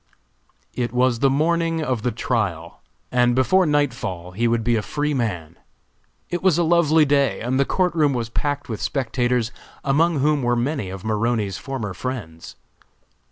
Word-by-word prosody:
It 120 -2 -2
was 125 -1 +2
the 135 - +4
morning 165 +3 +1
of 130 -6 -1
the 125 - 0
trial, 100 -9 -2 0.3
and 120 -1 +3
before 185 +8 +3
nightfall 120 - -1
he 115 +6 0
would 115 -1 +1
be 120 +1 +2
a 110 - +1
free 150 +6 -2
man. 90 - -3 0.7
It 175 - -2
was 185 -4 +3
a 175 - +3
lovely 160 -2 +4
day 140 -3 +2
and 125 +3 -1
the 140 - +3
court 180 -2 +1
room 150 -5 +2
was 115 -2 -2
packed 145 +4 -2
with 110 -3 -5
spectators, 125 -3 0 0.3
among 155 +4 +2
whom 150 +1 +2
were 120 -1 +1
many 125 -3 -2
of 95 +1 -8
Maroney's 110 -3 -1
former 115 -3 -4
friends. 90 -7 -6
125 Hz, 165 wpm, -22 LUFS, 115-145 Hz, 0.7 s, the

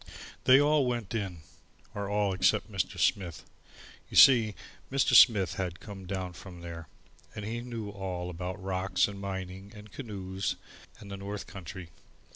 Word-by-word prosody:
They 130 +1 +8
all 145 -2 +3
went 120 -5 -2
in 95 -7 -3 0.5
or 100 -1 -4
all 105 -1 +1
except 95 - +2
Mr. - - -2
Smith. 85 -6 0 0.6
You - - -3
see, 115 -6 +8 0.4
Mr. 135 0 +2
Smith 100 -7 +7
had 90 -1 -3
come 95 -3 -9
down 95 -1 -3
from 90 0 -11
there, 85 -1 -8 0.5
and 105 - -5
he 115 +2 -3
knew 115 -4 -6
all 90 -3 -4
about 90 +3 -5
rocks 95 0 0
and 100 -1 -8
mining 95 0 -6
and 105 -1 -12
canoes 95 -5 -4 0.4
and 100 -2 -11
the 100 - -5
north 100 +1 -5
country. 95 -2 -9
100 Hz, 155 wpm, -30 LUFS, 95-105 Hz, 0.6 s, They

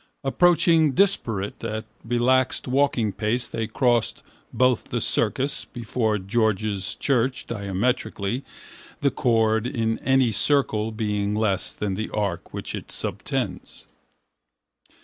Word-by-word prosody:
Approaching, 160 +1 +4
disparate, 115 - 0
at 110 0 -3 0.2
relaxed 125 +3 +1
walking 125 -5 +1
pace 115 +3 -1
they 110 -1 -3
crossed 120 0 +1 0.3
both 125 -2 +2
the - - -2
circus 140 +2 -1
before 115 -2 -1
George's 105 0 0
church 130 -1 0
diametrically, 110 +2 -2 0.6
the 140 -1 +3
chord 115 -1 +2
in 115 -4 -1
any 130 -3 +3
circle 110 -1 +1
being 105 -1 -1
less 105 -3 0
than 105 -2 -3
the 110 +3 -3
arc 100 -5 -3
which - - -5
it - - -6
subtends. - - -3
115 Hz, 110 wpm, -24 LUFS, 105-130 Hz, 0.6 s, Approaching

